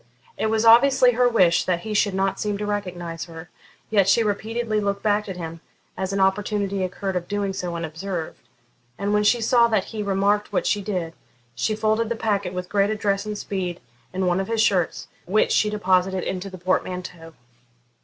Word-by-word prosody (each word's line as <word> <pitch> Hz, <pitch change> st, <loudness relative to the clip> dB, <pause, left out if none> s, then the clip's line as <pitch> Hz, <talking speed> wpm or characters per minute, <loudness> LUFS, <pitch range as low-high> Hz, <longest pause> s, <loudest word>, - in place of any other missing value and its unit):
It -, -, -1 dB
was 220 Hz, +1 st, +1 dB
obviously 245 Hz, +2 st, +6 dB
her 245 Hz, +1 st, +3 dB
wish 180 Hz, -7 st, +4 dB
that 175 Hz, -2 st, 0 dB
he 215 Hz, +2 st, -5 dB
should 205 Hz, -2 st, +2 dB
not 195 Hz, 0 st, 0 dB
seem 210 Hz, -1 st, -1 dB
to 210 Hz, -, -4 dB
recognise 180 Hz, -5 st, -4 dB
her, 165 Hz, 0 st, -11 dB, 0.4 s
yet 200 Hz, -3 st, +4 dB
she 230 Hz, -, +4 dB
repeatedly 220 Hz, +1 st, -1 dB
looked 200 Hz, -1 st, -2 dB
back 210 Hz, -1 st, +1 dB
at 185 Hz, -, -5 dB
him, 165 Hz, -1 st, -7 dB, 0.3 s
as 190 Hz, 0 st, -3 dB
an 195 Hz, -, -1 dB
opportunity 200 Hz, 0 st, 0 dB
occurred 190 Hz, +1 st, -3 dB
of 175 Hz, -1 st, -2 dB
doing 200 Hz, -1 st, -2 dB
so 180 Hz, -3 st, -4 dB
unobserved, 165 Hz, +1 st, -5 dB, 0.6 s
and 200 Hz, +2 st, -1 dB
when 210 Hz, 0 st, +3 dB
she 235 Hz, +3 st, +3 dB
saw 235 Hz, +1 st, +4 dB
that 215 Hz, -4 st, +1 dB
he 215 Hz, -, -3 dB
remarked 200 Hz, +1 st, +1 dB
what -, -, 0 dB
she 205 Hz, -, +1 dB
did, 180 Hz, -5 st, -3 dB, 0.4 s
she 215 Hz, -, -1 dB
folded 220 Hz, +1 st, 0 dB
the 235 Hz, -, -1 dB
packet 205 Hz, -5 st, -1 dB
with 180 Hz, 0 st, -5 dB
great 200 Hz, +1 st, +2 dB
address 205 Hz, -1 st, -1 dB
and 210 Hz, -1 st, -4 dB
speed 185 Hz, -4 st, -4 dB, 0.3 s
in 185 Hz, 0 st, -1 dB
one 180 Hz, +1 st, +2 dB
of 195 Hz, -, -2 dB
his 230 Hz, -1 st, -1 dB
shirts, 190 Hz, -6 st, +1 dB, 0.2 s
which 215 Hz, +4 st, +2 dB
she 210 Hz, -, +3 dB
deposited 190 Hz, -2 st, +1 dB
in 185 Hz, -, -3 dB
the 190 Hz, 0 st, -8 dB
portmanteau. 180 Hz, -2 st, -3 dB
200 Hz, 195 wpm, -23 LUFS, 185-215 Hz, 0.6 s, obviously